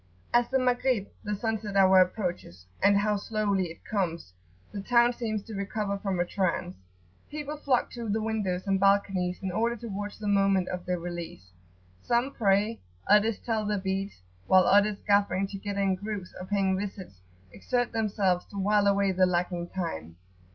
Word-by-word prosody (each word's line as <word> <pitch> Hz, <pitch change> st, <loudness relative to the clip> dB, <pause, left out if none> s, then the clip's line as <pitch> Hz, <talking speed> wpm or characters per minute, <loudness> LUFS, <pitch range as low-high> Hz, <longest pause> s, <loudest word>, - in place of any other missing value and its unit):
As 240 Hz, 0 st, +4 dB
the 265 Hz, -, +2 dB
Maghrib, 250 Hz, -4 st, +1 dB
the 210 Hz, 0 st, -2 dB
sunset 215 Hz, -1 st, -3 dB
hour, 190 Hz, -1 st, +6 dB
approaches 180 Hz, -, -1 dB, 0.2 s
and 200 Hz, +1 st, +5 dB
how 210 Hz, +1 st, +1 dB
slowly 200 Hz, -2 st, 0 dB
it 165 Hz, -1 st, -10 dB
comes! 170 Hz, -, -2 dB, 0.4 s
the 200 Hz, -, -5 dB
town 240 Hz, +3 st, +4 dB
seems 215 Hz, -4 st, -3 dB
to 220 Hz, -, -10 dB
recover 200 Hz, 0 st, -2 dB
from 195 Hz, -3 st, -2 dB
a 175 Hz, -, +2 dB
trance. 180 Hz, -1 st, -1 dB, 0.6 s
People 300 Hz, 0 st, -5 dB
flock 275 Hz, -4 st, 0 dB
to 235 Hz, -3 st, -6 dB
the 215 Hz, +2 st, +1 dB
windows 210 Hz, -5 st, -2 dB
and 195 Hz, -1 st, +1 dB
balconies, 195 Hz, -2 st, +2 dB
in 190 Hz, -, -2 dB
order 230 Hz, +5 st, 0 dB
to 235 Hz, 0 st, -8 dB
watch 205 Hz, +1 st, -5 dB
the 210 Hz, -, -5 dB
moment 195 Hz, -2 st, +2 dB
of 180 Hz, -1 st, -5 dB
their 180 Hz, 0 st, 0 dB
release. 170 Hz, -, -7 dB, 0.5 s
Some 240 Hz, +3 st, +1 dB
pray, 210 Hz, 0 st, +1 dB, 0.3 s
others 210 Hz, +1 st, +4 dB
tell 225 Hz, -2 st, -2 dB
their 210 Hz, 0 st, -1 dB
beads; 190 Hz, -, -3 dB, 0.2 s
while 185 Hz, 0 st, +6 dB
others, 205 Hz, +1 st, +4 dB
gathering 200 Hz, -2 st, +2 dB
together 200 Hz, 0 st, -4 dB
in 195 Hz, -1 st, +2 dB
groups 200 Hz, -1 st, -5 dB
or 185 Hz, -, -7 dB
paying 195 Hz, -2 st, +1 dB
visits, 190 Hz, -, -7 dB, 0.3 s
exert 245 Hz, -, -1 dB
themselves 200 Hz, -5 st, 0 dB
to 200 Hz, -, -11 dB
while 205 Hz, +1 st, +2 dB
away 200 Hz, -1 st, +3 dB
the 185 Hz, 0 st, +3 dB
lagging 175 Hz, -1 st, -1 dB
time. 85 Hz, -, -5 dB
200 Hz, 170 wpm, -28 LUFS, 185-215 Hz, 0.6 s, hour